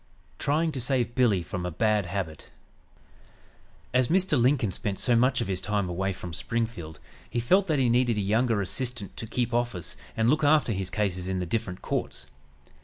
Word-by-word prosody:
TRYING 160 +3 +1
TO 135 -3 -4
SAVE 125 -1 0
BILLY 115 -9 +3
FROM 90 +1 -5
A 90 - -2
BAD 105 +2 +1
HABIT 90 -5 -4 1.4
As 125 0 +3
Mr. 185 -1 +2
Lincoln 120 -5 +3
spent 100 0 -3
so 120 - +2
much 130 +2 +3
of - - -2
his 95 -1 -1
time 105 -2 0
away 95 +3 -1
from 90 -2 -7
Springfield 110 -4 -3 0.3
he 120 - -1
felt 185 +12 +3
that 155 -3 +1
he 130 -2 +3
needed 120 -1 +2
a - - +1
younger 110 +2 +2
assistant 120 +1 -3
to 115 - -6
"keep 120 +1 -1
office" 120 -7 -1 0.2
and 110 0 +2
look 150 +5 +3
after 145 -5 +4
his 95 -1 -3
cases 95 -2 -1
in 95 - -1
the 90 - -2
different 95 0 -3
courts. - - -3
115 Hz, 185 wpm, -27 LUFS, 95-125 Hz, 1.4 s, after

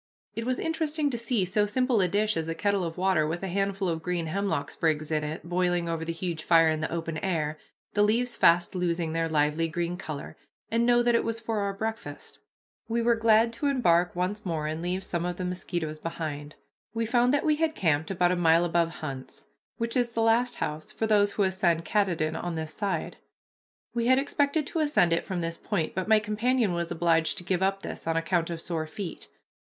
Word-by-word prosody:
It 230 +1 -4
was 255 0 0
interesting 315 -2 -1
to 240 - -2
see 230 -4 0
so 205 +3 +1
simple 250 0 +2
a 185 - +3
dish 210 +4 +1
as 165 0 -2
a 165 - -2
kettle 200 +2 +1
of 165 0 -4
water 185 -4 +2
with 170 +4 -3
a - - -1
handful 195 +1 -1
of 165 -2 -1
green 175 0 -2
hemlock 175 -4 -2
sprigs 155 -1 -1
in 155 -1 +1
it 150 +1 -5
boiling 175 -1 +1
over 165 -1 -2
the 165 - -3
huge 165 -1 -4
fire 165 -1 +5
in 155 0 -1
the 155 - -2
open 165 -1 -3
air, 155 -5 -1 0.3
the 205 - +2
leaves 235 +3 +2
fast 175 +1 +4
losing 170 -3 -1
their 165 0 0
lively 150 +1 +1
green 175 +2 -2
color, 155 -6 -7 0.4
and 230 +1 +2
know 240 0 +4
that 240 0 +3
it 230 - +3
was 230 0 -2
for 225 -1 -2
our 200 -1 -1
breakfast. 220 +2 -6 0.5
We 230 +1 0
were 235 0 +4
glad 225 0 +4
to 260 +5 -1
embark 180 -11 +2
once 185 +4 -2
more 160 -4 -2
and 155 +1 -3
leave 180 +2 -2
some 170 -2 -3
of 175 0 -3
the 185 - -3
mosquitoes 175 -3 -3
behind. 150 -3 -5 0.4
We 230 0 0
found 245 +2 +3
that 290 +2 +1
we 305 -1 +3
had 320 0 0
camped 160 -3 +1
about 180 -2 +2
a - - +2
mile 170 0 +4
above 170 -1 +2 0.2
Hunt's, 135 -3 -7 0.3
which 230 -1 -2
is 245 -2 +2
the 230 -1 -1
last 235 +2 +3
house 155 +1 -4
for 225 - -2
those 205 -2 +3
who 205 - +1
ascend 175 -3 +1
Katahdin 170 -5 0
on 175 +1 -3
this 160 -1 -4
side. 200 -3 -3 0.8
We 235 0 0
had 260 +1 +5
expected 285 +2 +1
to 325 - -3
ascend 290 - +3
it 165 - -1
from 185 -2 -2
this 165 0 -3
point, 180 -7 -2
but 185 +1 -2
my 220 0 +6
companion 215 0 +1
was 170 -1 -2
obliged 165 -1 +1
to - - -5
give 185 0 -1
up 195 0 0
this - - -6
on 165 0 +1
account 165 0 0
of 170 -1 -4
sore 160 -2 -3
feet. 175 +2 -6
180 Hz, 220 wpm, -27 LUFS, 165-225 Hz, 0.8 s, my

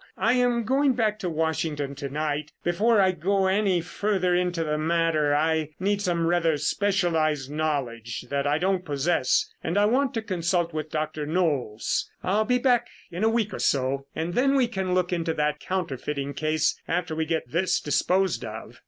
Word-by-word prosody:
I 225 - +2
am 245 -2 +2
going 270 +3 +2
back 220 -3 0
to 185 - -2
Washington 155 -3 -1
to 140 0 -6
night. 150 +1 -2
Before 210 +6 +3
I 190 -1 +4
go 190 +3 0
any 190 -2 +2
further 185 +1 0
into 175 -1 0
the 150 -1 -1
matter, 160 -2 +2
I 155 0 0
need 200 +2 0
some 175 -4 0
rather 165 -2 +2
specialized 160 -7 0
knowledge 130 -7 -2
that 140 0 0
I 145 +1 +2
don't 185 +2 0
possess 145 -3 +1
and 165 +4 -1
I 205 - +5
want 260 +4 +1
to 225 - -2
consult 175 -3 -1
with 155 0 -4
Dr. 155 -1 -3
Knolles. 145 -10 0
I'll 205 +4 +1
be 250 +2 +2
back 245 -1 +2 0.2
in 175 +4 -3
a 220 - +4
week 225 -2 0
or - - -5
so 135 0 0
and 165 +2 -2
then 270 +5 +3
we 260 -3 +3
can 190 -5 -2
look 180 0 +1
into 165 -2 -1
that 150 0 0
counterfeiting 145 -6 -3
case 155 +1 0
after 170 -1 -1
we 160 0 -1
get 160 -6 -2
this 175 +2 +1
disposed 185 +5 +1
of." 110 +1 -8
170 Hz, 180 wpm, -26 LUFS, 150-195 Hz, 0.2 s, I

